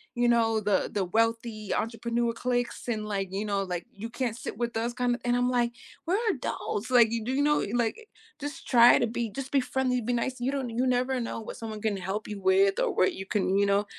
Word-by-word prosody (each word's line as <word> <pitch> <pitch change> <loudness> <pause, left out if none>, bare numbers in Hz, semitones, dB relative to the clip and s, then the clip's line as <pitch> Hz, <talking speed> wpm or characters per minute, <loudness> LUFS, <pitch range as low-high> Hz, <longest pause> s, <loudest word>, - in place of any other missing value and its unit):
you 240 0 +2
know, 225 -2 +3
the 205 -1 +1
the 200 -3 0
wealthy 225 +1 0
entrepreneur 235 +1 -1
cliques 245 +1 -2
and, 215 -3 -2
like, 195 -2 -2
you 200 +2 -2
know, 200 -1 0
like, 180 -2 -4
you 220 +3 -7
can't 240 -2 -2
sit - - -6
with 235 -1 -2
us 235 +2 -1
kinda 245 0 0
and 245 0 +2
I'm, 245 0 +2
like, 240 -1 +1 0.4
we're 365 +4 +2
adults, 240 - -3
like, 235 -3 +6
you 230 -1 -2
do, 245 - -2
you 280 +2 +2
know, 295 0 +2
like, 245 - -1 0.3
just 290 +3 -7
try 240 -1 +7
to - - +2
be 230 0 -2
just 270 +4 -6
be 280 - +4
friendly, 250 0 0
be 240 +2 -1
nice. 250 +2 -1
You 255 +2 0
don't, 270 -3 -2
you 240 +3 0
never 255 +1 +1
know 235 - -4
what 220 - -8
someone 220 -2 -6
can 210 -2 0
help 190 +3 -4
you 205 -2 -6
with 195 +1 +4
or - - +1
what 185 - +2
you 190 - -7
can, 195 -1 +1
you 200 - +4
know, 200 +1 +2
235 Hz, 235 wpm, -28 LUFS, 210-245 Hz, 0.4 s, try